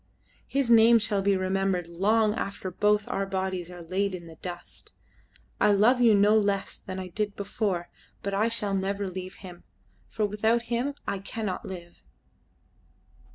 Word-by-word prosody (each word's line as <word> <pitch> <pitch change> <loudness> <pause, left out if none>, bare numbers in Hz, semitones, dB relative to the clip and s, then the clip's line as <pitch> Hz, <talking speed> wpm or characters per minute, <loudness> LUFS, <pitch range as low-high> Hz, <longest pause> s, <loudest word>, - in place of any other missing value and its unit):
His 270 -3 0
name 230 +1 +7
shall 210 -2 0
be 195 0 +2
remembered 185 -1 0
long 210 +5 +2
after 195 -4 -4
both 210 +2 +2
our 195 0 -2
bodies 190 -2 -3
are 175 -1 -9
laid 190 +3 -1
in 175 -2 -9
the 165 -1 -12
dust. 175 0 -9 0.7
I 210 - +5
love 235 +5 +4
you 230 -3 +6
no 205 +2 +5
less 200 -2 +1
than 185 -1 -7
I 185 -1 -5
did 205 +2 -3
before, 195 -3 -2 0.4
but 200 - -2
I 210 +3 +2
shall 210 -3 -1
never 195 +1 -1
leave 185 0 -6
him, 175 -1 -11 0.5
for 215 - -1
without 220 +3 +1
him 265 +4 -1
I 200 - -1
cannot 200 0 -4
live." 175 -2 -9
200 Hz, 160 wpm, -27 LUFS, 185-215 Hz, 0.7 s, name